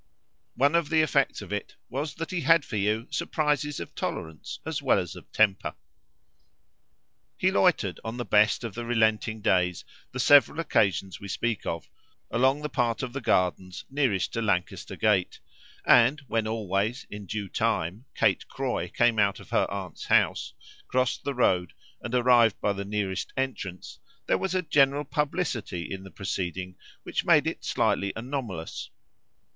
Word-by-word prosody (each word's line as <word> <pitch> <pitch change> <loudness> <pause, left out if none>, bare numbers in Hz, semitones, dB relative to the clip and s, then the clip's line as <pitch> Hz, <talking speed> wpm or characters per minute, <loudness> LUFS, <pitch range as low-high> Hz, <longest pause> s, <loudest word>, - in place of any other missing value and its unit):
One 140 +4 +3
of 170 -3 +2
the 160 -1 +4
effects 155 - +1
of - - -7
it - - -4
was 140 +3 -4
that 165 - -5
he 180 -2 -1
had 165 +1 +4
for 135 - -6
you 105 +3 0
surprises 150 -3 0
of 85 - -7
tolerance 80 -1 -5
as - - -3
well - - +3
as - - -3
of - - -13
temper. 100 -3 +2 1.6
He - - +2
loitered, - - +2
on 110 +2 -5
the 120 - -3
best 105 +3 +3
of 115 -4 -5
the 120 - -5
relenting 110 -2 +1
days, 90 -4 +1 0.3
the 130 - -6
several 145 +3 +6
occasions 95 - +1
we 100 - -8
speak 115 +2 -2
of, 85 -1 -3 0.4
along 130 +5 +2
the - - 0
part 120 -2 0
of 125 -2 -4
the 140 - -4
Gardens 90 -3 0
nearest 130 -10 0
to 115 - -1
Lancaster 100 -5 -1
Gate, 105 -5 +1 0.5
and 125 +5 +6
when, 115 -5 -1
always, 110 +2 -1
in 105 -1 -8
due 105 +1 -3
time, 95 +5 -1
Kate - - +2
Croy - - -2
came 120 -2 +2
out 100 -1 +2
of - - -14
her - - +2
aunt's 95 -4 -6
house, - - +2 0.3
crossed 130 -1 0
the 140 - -2
road 90 -8 +2 0.3
and 120 +1 -3
arrived 120 -3 +4
by 105 - +1
the 100 0 -4
nearest 100 -2 -3
entrance, 115 -9 -4 0.3
there - - +1
was 190 -1 -2
a 185 - +1
general 140 -2 +3
publicity 140 - -2
in 95 - -6
the 95 - -10
proceeding 90 -1 -4 0.3
which - - -2
made - - +5
it - - -3
slightly 100 0 +1
anomalous. 115 - -5
115 Hz, 165 wpm, -27 LUFS, 95-135 Hz, 1.6 s, several